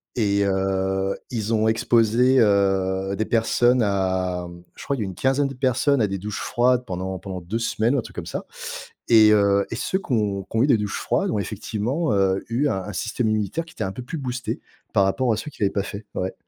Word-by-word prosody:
et 100 Hz, -3 st, +2 dB
heu, 95 Hz, 0 st, 0 dB
ils 115 Hz, -2 st, -2 dB
ont 110 Hz, 0 st, +2 dB
exposé, 115 Hz, +3 st, +3 dB
heu, 95 Hz, -2 st, +2 dB
des 110 Hz, -, -1 dB
personnes 120 Hz, +2 st, +3 dB
à 95 Hz, -3 st, 0 dB
mmh 85 Hz, 0 st, -12 dB
je -, -, -10 dB
crois 140 Hz, -, -1 dB
il -, -, -6 dB
y -, -, -1 dB
a -, -, -3 dB
une 95 Hz, -, -5 dB
quinzaine 135 Hz, +5 st, +1 dB
de 135 Hz, -, -6 dB
personnes 130 Hz, +1 st, +1 dB
à 105 Hz, -, +3 dB
des 100 Hz, 0 st, -3 dB
douches 100 Hz, +2 st, -5 dB
froides 125 Hz, +1 st, +1 dB
pendant 95 Hz, +1 st, -4 dB
pendant 95 Hz, 0 st, -6 dB
2 100 Hz, +7 st, -3 dB
semaines 115 Hz, +1 st, +1 dB
ou -, -, +2 dB
un -, -, -1 dB
truc -, -, -13 dB
comme -, -, -5 dB
ça -, -, -5 dB, 0.6 s
et 110 Hz, -2 st, +7 dB
heu 100 Hz, -1 st, +3 dB
et -, -, -2 dB
ceux 155 Hz, +10 st, -1 dB
qui 175 Hz, -, -9 dB
ont 100 Hz, -4 st, 0 dB
qui 100 Hz, -, -5 dB
ont 115 Hz, -, +4 dB
eu -, -, +3 dB
des 130 Hz, -, +5 dB
douches 105 Hz, -1 st, -3 dB
froides -, -, 0 dB
ont 105 Hz, -, 0 dB
effectivement, 110 Hz, -, -2 dB
heu, 95 Hz, -1 st, +2 dB
eu 125 Hz, +6 st, +1 dB
un 95 Hz, -8 st, -1 dB
un 105 Hz, -, -7 dB
système 110 Hz, +4 st, -1 dB
immunitaire 110 Hz, -, -1 dB
qui 165 Hz, -, -16 dB
était -, -, -4 dB
un 95 Hz, -, -3 dB
peu 125 Hz, -, -7 dB
plus 145 Hz, +7 st, -5 dB
boosté 130 Hz, -2 st, -4 dB, 0.3 s
par 100 Hz, -, +4 dB
rapport 120 Hz, +6 st, +1 dB
à -, -, -2 dB
ceux 150 Hz, -, -6 dB
qui -, -, -17 dB
l'avaient 100 Hz, -1 st, +2 dB
pas 100 Hz, -, -1 dB
fait, 100 Hz, +1 st, -7 dB
ouais. 95 Hz, +1 st, -2 dB
105 Hz, 245 wpm, -23 LUFS, 95-120 Hz, 0.6 s, et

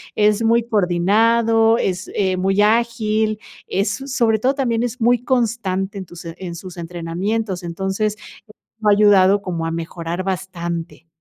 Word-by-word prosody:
Es 210 Hz, +1 st, +2 dB
muy 230 Hz, +1 st, +3 dB
coordinado, 225 Hz, +4 st, +3 dB
es 185 Hz, -4 st, -2 dB
eh, 190 Hz, -2 st, +1 dB
muy 195 Hz, +2 st, +1 dB
ágil, 220 Hz, -1 st, +1 dB, 0.3 s
es, 200 Hz, +1 st, 0 dB
so 270 Hz, +5 st, -7 dB
sobre 230 Hz, -4 st, +1 dB
todo, 260 Hz, +5 st, +1 dB
también 240 Hz, -5 st, 0 dB
es 245 Hz, +1 st, -4 dB
muy 240 Hz, +1 st, +3 dB
constante 210 Hz, -6 st, -1 dB
en 190 Hz, -, -7 dB
tus 175 Hz, 0 st, -12 dB
en 170 Hz, +1 st, -7 dB
sus 180 Hz, +1 st, -10 dB
entrenamientos. 175 Hz, +4 st, -3 dB
Entonces, 190 Hz, +5 st, -2 dB, 0.6 s
lo 215 Hz, -1 st, +2 dB
ha -, -, +6 dB
ayudado 200 Hz, -1 st, +5 dB
como 170 Hz, -3 st, -3 dB
a 165 Hz, -, -3 dB
mejorar 170 Hz, +2 st, -4 dB
bastante. 175 Hz, -3 st, -5 dB
200 Hz, 150 wpm, -20 LUFS, 180-225 Hz, 0.6 s, ha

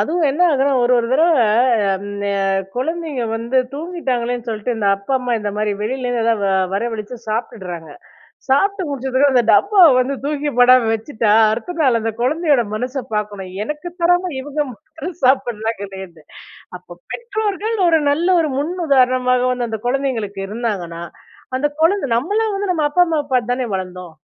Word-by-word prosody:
அதுவும் 320 Hz, +9 st, +1 dB
என்ன 295 Hz, +6 st, -4 dB
ஆகுதுன்னா 280 Hz, -2 st, +2 dB
ஒரு 245 Hz, -, +3 dB
ஒரு 230 Hz, -, 0 dB
தடவ 310 Hz, +5 st, +4 dB, 0.7 s
அந்த 205 Hz, +1 st, -6 dB, 0.5 s
குழந்தைங்க 315 Hz, 0 st, -2 dB
வந்து 235 Hz, +3 st, 0 dB, 0.2 s
தூங்கிட்டாங்களேன்னு 250 Hz, -8 st, -3 dB
சொல்லிட்டு 225 Hz, +2 st, -2 dB
இந்த 205 Hz, -2 st, 0 dB
அப்பா 200 Hz, +7 st, -6 dB
அம்மா 250 Hz, -1 st, -3 dB
இந்த 205 Hz, -, -2 dB
மாரி 215 Hz, 0 st, 0 dB
வெளியிலேருந்து 245 Hz, +1 st, -2 dB
எதாவது 220 Hz, -4 st, +1 dB, 0.3 s
வரவழிச்சு 225 Hz, +2 st, -3 dB
சாப்பிட்டுறாங்க. 185 Hz, -8 st, -5 dB, 0.6 s
சாப்பிட்டு 390 Hz, +9 st, +2 dB
முடிச்சதுக்கு 270 Hz, 0 st, +1 dB
அந்த 250 Hz, -2 st, +4 dB
டப்பாவ 400 Hz, -3 st, +6 dB
வந்து 255 Hz, +2 st, 0 dB
தூக்கி 295 Hz, 0 st, -2 dB
போடாம 250 Hz, -1 st, +6 dB
வச்சுட்டா, 225 Hz, -1 st, -1 dB, 0.2 s
அடுத்த 240 Hz, +11 st, -4 dB
நாள் 260 Hz, -6 st, +3 dB
அந்த 225 Hz, +1 st, -1 dB
குழந்தையோட 290 Hz, 0 st, +2 dB
மனச 255 Hz, +4 st, -3 dB
பார்க்கணும். 205 Hz, -3 st, -4 dB
எனக்கு 300 Hz, +6 st, -5 dB
தராம 355 Hz, +1 st, +2 dB
இவங்க 290 Hz, +2 st, -4 dB
மட்டும் 315 Hz, -, -9 dB
சாப்பிடறாங்களேனு. 205 Hz, -, -1 dB, 0.5 s
அப்போ 180 Hz, -1 st, -14 dB, 0.2 s
பெற்றோர்கள் 435 Hz, -1 st, -2 dB
ஒரு 325 Hz, -1 st, +4 dB
நல்ல 320 Hz, +5 st, +1 dB
ஒரு 310 Hz, -, -1 dB
முன் 295 Hz, +5 st, -1 dB, 0.2 s
உதாரணமாக 255 Hz, -2 st, +3 dB
வந்து, 245 Hz, -1 st, -2 dB
அந்த 220 Hz, -1 st, -4 dB
குழந்தைங்களுக்கு 245 Hz, -7 st, -2 dB
இருந்தாங்கன்னா, 195 Hz, -6 st, -4 dB, 0.5 s
அந்த 290 Hz, +3 st, +1 dB
கொழந்த, 370 Hz, 0 st, +2 dB
நம்மல்லாம் 415 Hz, -, 0 dB
வந்து 395 Hz, -1 st, -1 dB
நம்ம 310 Hz, -3 st, 0 dB
அப்பா 355 Hz, +4 st, +5 dB
அம்மா 320 Hz, -2 st, 0 dB
பார்த்துதானே 245 Hz, 0 st, 0 dB
வளர்ந்தோம். 180 Hz, -3 st, -7 dB
250 Hz, 145 wpm, -19 LUFS, 220-300 Hz, 0.7 s, டப்பாவ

